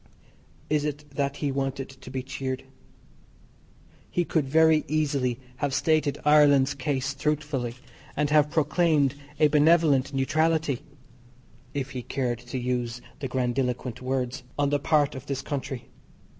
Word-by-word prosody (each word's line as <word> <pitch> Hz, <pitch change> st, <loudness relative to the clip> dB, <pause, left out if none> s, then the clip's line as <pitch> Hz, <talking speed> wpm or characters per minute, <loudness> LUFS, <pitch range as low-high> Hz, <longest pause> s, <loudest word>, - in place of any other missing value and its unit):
Is 150 Hz, -1 st, +1 dB
it 150 Hz, 0 st, -3 dB
that 140 Hz, 0 st, -1 dB
he 140 Hz, -, +1 dB
wanted 135 Hz, 0 st, -2 dB
to 135 Hz, -1 st, -12 dB
be 130 Hz, -1 st, -4 dB
cheered? 130 Hz, 0 st, -4 dB, 1.5 s
He 175 Hz, -, 0 dB
could 155 Hz, -5 st, 0 dB
very 160 Hz, +1 st, +5 dB
easily 140 Hz, -5 st, 0 dB, 0.2 s
have 140 Hz, 0 st, -1 dB
stated 155 Hz, -3 st, +2 dB
Ireland's 145 Hz, -2 st, +5 dB
case 135 Hz, 0 st, -2 dB
truthfully, 140 Hz, -4 st, -2 dB, 0.4 s
and 150 Hz, 0 st, +1 dB
have 150 Hz, -1 st, +5 dB
proclaimed 150 Hz, -2 st, +2 dB, 0.3 s
a 155 Hz, -, +6 dB
benevolent 150 Hz, -2 st, +4 dB
neutrality 155 Hz, 0 st, +1 dB, 0.9 s
(if 135 Hz, -1 st, -2 dB
he 130 Hz, -, -4 dB
cared 120 Hz, -2 st, -2 dB
to 120 Hz, +1 st, -6 dB
use 120 Hz, -1 st, -2 dB, 0.2 s
the 135 Hz, -, -3 dB
grandiloquent 125 Hz, -1 st, -1 dB
words) 130 Hz, 0 st, -2 dB, 0.2 s
on 145 Hz, -1 st, +1 dB
the 145 Hz, -, +2 dB
part 150 Hz, 0 st, +2 dB
of 130 Hz, +1 st, -9 dB
this 135 Hz, -1 st, -3 dB
country. 135 Hz, -3 st, -4 dB
140 Hz, 135 wpm, -26 LUFS, 130-150 Hz, 1.5 s, a